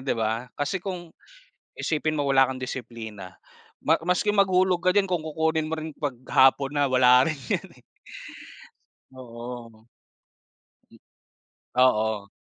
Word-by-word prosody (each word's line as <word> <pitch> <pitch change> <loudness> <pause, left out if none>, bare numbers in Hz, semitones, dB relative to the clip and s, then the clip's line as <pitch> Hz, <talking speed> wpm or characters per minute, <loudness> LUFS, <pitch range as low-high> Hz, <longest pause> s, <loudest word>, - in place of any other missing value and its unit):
'di 135 - 0
ba? 115 +2 -2
Kasi 150 +6 -3
kung, 180 -3 -5 0.6
isipin 155 0 -2
mo 145 -1 -1
wala 135 -1 +5
kang 130 - -9
disiplina 115 -7 -7 0.5
ma 160 +2 +3
maski 180 +4 0
maghulog 190 -3 +3
ka 185 - +5
diyan 195 0 +2
kung 175 -4 -1
kukunin 160 0 -1
mo - - +2
rin 160 0 -6
'pag 145 -4 -3
hapon 135 +2 +4
na, 145 - +3
wala 125 -1 +5
rin 155 -4 -3
yan - - -1 0.2
eh. - - -30 1.3
Oo. 120 -2 -10 1.0
Hmm, - - -17 0.8
oo. 110 -5 +2
135 Hz, 135 wpm, -25 LUFS, 120-160 Hz, 1.3 s, wala